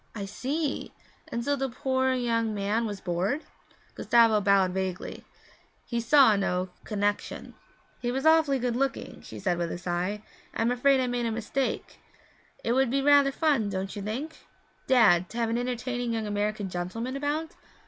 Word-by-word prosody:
'I 205 -2 -4
see! 275 +8 -3 0.4
And 235 0 -4
so 285 - +2
the 270 -1 -2
poor 260 +1 0
young 230 -3 0
man 210 +3 0
was 205 -2 -5
bored?' 185 - -1 0.5
Gustavo 230 -3 +4
bowed 195 -2 +3
vaguely. 185 -1 -4 0.6
He 235 - -2
saw 235 -1 +6
no 185 -2 -1 0.2
connexion. 205 -1 -2 0.5
'He 240 - -2
was 265 +3 -2
awfully 315 -3 +5
good 245 -2 -1
looking,' 270 +2 -2
she - - -10
added 180 -3 -1
with 170 -1 -2
a - - -4
sigh. 180 +4 -2 0.3
'I'm 230 +2 +1
afraid 265 +2 +3
I - - +1
made 245 -1 -1
a - - -1
mistake. 240 +4 -3 0.6
It 230 - 0
would 260 +1 +3
be 270 +2 0
rather 285 -1 +5
fun, 275 -8 +1
don't 190 0 -4
you 205 - -5
think, 250 +10 -4 0.5
Dad, 195 -9 +5
to 230 - -8
have 230 -1 0
an 230 - 0
entertaining 245 -1 -2
young 225 -1 -2
American 205 0 -2
gentleman 185 +8 -4
about?' 295 +3 -2
230 Hz, 170 wpm, -27 LUFS, 200-265 Hz, 0.6 s, saw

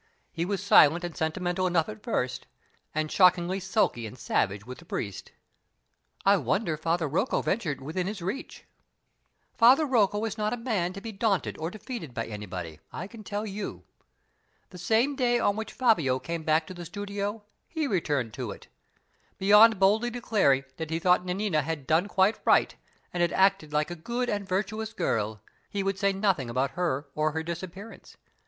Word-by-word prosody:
He 170 0 -2
was 195 0 -2
silent 170 -3 +6
and 175 -2 -5
sentimental 175 +3 -1
enough 170 -3 +2
at 215 0 -8
first, 130 - -2 0.5
and 155 0 -1
shockingly 180 0 +4
sulky 180 - 0
and 125 - -11
savage 100 -3 -1
with 125 +1 -9
the - - -14
priest 100 - -5 0.5
" 60 +1 -33
"I 200 +1 +6
wonder 160 - 0
Father 165 +1 0
Rocco 185 - 0
ventured 175 -11 -1
within 165 +6 -3
his 210 0 -4
reach." 200 - -5 0.9
"Father 255 +6 +6
Rocco 220 -5 +2
is 220 - -4
not 210 +1 0
a - - -2
man 215 -8 -1
to 195 - -8
be 225 +1 -6
daunted 205 -2 0
or 160 +1 -2
defeated 200 - -7
by 115 - -2
anybody, 95 -7 -7
I - - -5
can 215 +2 -11
tell 205 +1 -3
you. 205 0 -6 0.9
The 180 - -10
same 230 - +2
day 245 -3 +2
on 205 - +2
which 220 +1 -5
Fabio 170 - +2
came 165 +6 -4
back 155 +1 +2
to - - -8
the 175 -1 -8
studio, 205 +3 -4 0.2
he 320 -2 -2
returned 145 - -1
to 125 -3 -5
it. 100 - -10 0.7
Beyond 210 +3 +7
boldly 210 +5 +3
declaring 215 - +2
that 160 -1 -5
he 160 - -1
thought 180 +1 +3
Nanina 180 -3 0
had 150 -1 -4
done 165 +6 +2
quite 195 +1 +2
right, - - +3 0.4
and 175 - -1
had 175 - +2
acted 190 -5 +3
like 150 +3 0
a - - -4
good 240 +9 -2
and 205 -1 -3
virtuous 215 +4 -2
girl, 110 - -1 0.3
he 200 -1 -2
would 195 0 -1
say 200 0 +3
nothing 190 - 0
about 130 +3 0
her 160 -5 -1
or 155 0 0
her 160 +1 -2
disappearance. 185 +6 -8
185 Hz, 180 wpm, -28 LUFS, 155-210 Hz, 0.9 s, Beyond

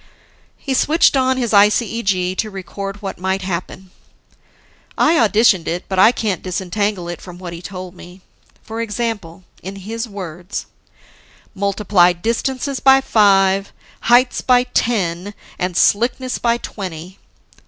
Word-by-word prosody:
He 270 - -3
switched 300 +4 +3
on 260 -1 +2
his 240 -3 -1
ICEG 200 -3 +2
to 215 - -1
record 195 +1 -7
what 195 - -5
might 190 +1 -1
happen. 185 +1 -5 1.1
I 310 - +4
auditioned 220 - +3
it, 175 +2 -3
but 190 -1 -1
I 220 - +7
can't 210 -7 -2
disentangle 190 +1 -2
it 175 0 -6
from 180 -2 -11
what 180 -2 -8
he 170 - -8
told 185 0 -8
me. 180 +1 -14 0.4
For 225 +1 -5
example, 210 -6 -4 0.2
in 190 +2 -7
his 225 +4 -6
words: 180 -2 -6 0.9
Multiply 195 -2 +2
distances 255 +8 -2
by 270 0 +6
five, 195 -5 +3 0.3
heights 245 +1 +3
by 250 -1 +4
ten, 205 -6 -1 0.2
and 180 -1 -2
slickness 245 +4 +1
by 235 0 +1
twenty. 185 -5 -8
200 Hz, 130 wpm, -18 LUFS, 185-230 Hz, 1.1 s, I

